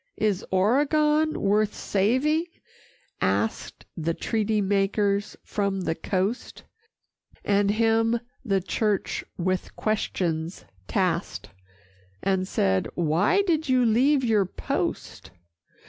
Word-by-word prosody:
"Is 210 -3 0
Oregon 300 +10 +2
worth 210 +1 +1
saving?" 260 - +1 0.8
asked - - -1
The 165 0 -2
treaty 220 -1 0
makers 200 +1 0
from 200 -2 -2
the 170 - -1
coast; 190 +7 -3 0.8
And 200 0 +2
him 225 +2 +2 0.2
the 195 -6 +1
church 210 +1 -1
with 185 +1 -2
questions 175 -6 -2 0.2
tasked, - - -1 0.7
And 190 -1 0
said, 95 - +1
"Why 175 - +2
did 320 -5 0
you 255 -1 +4
leave 260 +5 +3
your 215 -5 +2
post?" - - -4
210 Hz, 100 wpm, -25 LUFS, 190-240 Hz, 0.8 s, you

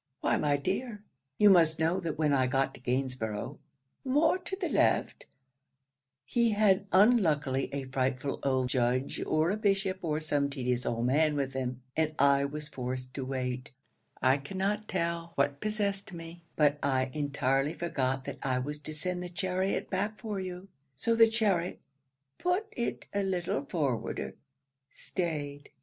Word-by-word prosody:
'Why, - - +2
my 145 -1 +2
dear, 205 - -3 0.3
you 210 -1 +7
must 165 -3 +5
know 165 +3 +1
that 165 -4 -3
when 150 -2 +2
I 130 -2 +3
got 135 +1 +1
to - - -12
Gainsborough's 125 -1 -2 0.4
[more 300 +7 +3
to 370 +1 -5
the 380 -2 -2
left] - - +1 1.0
he 235 - +2
had 205 -1 +3
unluckily 160 - +3
a 140 0 -3
frightful 130 +1 -1
old 130 -2 +1
judge, 125 +1 0
or 155 +3 +2
a 205 - -1
bishop, 195 -2 +1
or 155 -3 -1
some 145 -2 +1
tedious 125 -3 -1
old 115 0 0
man 150 +4 +3
with 135 -2 -1
him, 130 -1 -3
and 155 -1 0
I 140 0 +4
was 150 +1 -5
forced 130 -2 -5
to 135 - -4
wait: 130 0 -3 0.5
I 130 +2 +5
cannot 195 +8 -2
tell 170 -2 -2
what 140 0 +1
possessed 205 -2 -1
me, 165 0 -9
but 150 -1 +3
I 130 -2 +1
entirely 140 0 0
forgot 135 -6 -1
that - - -6
I 130 -1 0
was 145 +4 -3
to 155 +1 -5
send 180 +3 -2
the 180 - -5
chariot 185 +2 -1
back 205 +3 -1
for 215 -4 -4
you. 185 0 -6 0.3
So 230 - +1
the 225 0 +6
chariot 200 -6 +1 0.6
[put 360 +4 +1
it 235 - -3
a 200 - +1
little 175 -7 -1
forwarder] 140 -8 -2 0.6
staid. 145 -5 -4
155 Hz, 160 wpm, -30 LUFS, 135-190 Hz, 1.0 s, you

